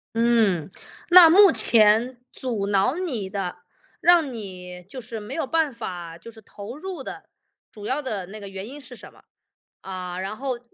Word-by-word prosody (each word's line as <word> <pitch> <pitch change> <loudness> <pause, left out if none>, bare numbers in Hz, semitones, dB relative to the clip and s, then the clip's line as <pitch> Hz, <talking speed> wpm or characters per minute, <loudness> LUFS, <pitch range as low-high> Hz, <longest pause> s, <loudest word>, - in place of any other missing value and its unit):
嗯， 225 -8 +2 0.4
那 350 -2 +9
目 390 +1 +7
前 230 +3 +4 0.2
阻 225 -6 -3
挠 200 +8 +1
你 245 - -3
的， 195 -3 -5 0.4
让 340 -6 +4
你 180 -4 -9
就 255 +8 -10
是 225 -2 -7
没 220 +6 -8
有 320 -5 -3
办 320 -2 +1
法， 175 -7 -7
就 230 - -13
是 220 -1 -14
投 210 +6 -10
入 365 -3 -7
的， - - -9 0.4
主 210 -1 -11
要 275 +6 -1
的 210 -9 -4
那 205 +4 -10
个 200 -2 -9
原 195 +2 -7
因 285 +3 -10
是 265 -2 -12
什 - - -12
么？ - - -21 0.6
啊， 185 -1 -6
然 195 +3 -4
后 260 -1 -4
225 Hz, 190 characters per minute, -23 LUFS, 195-265 Hz, 0.6 s, 那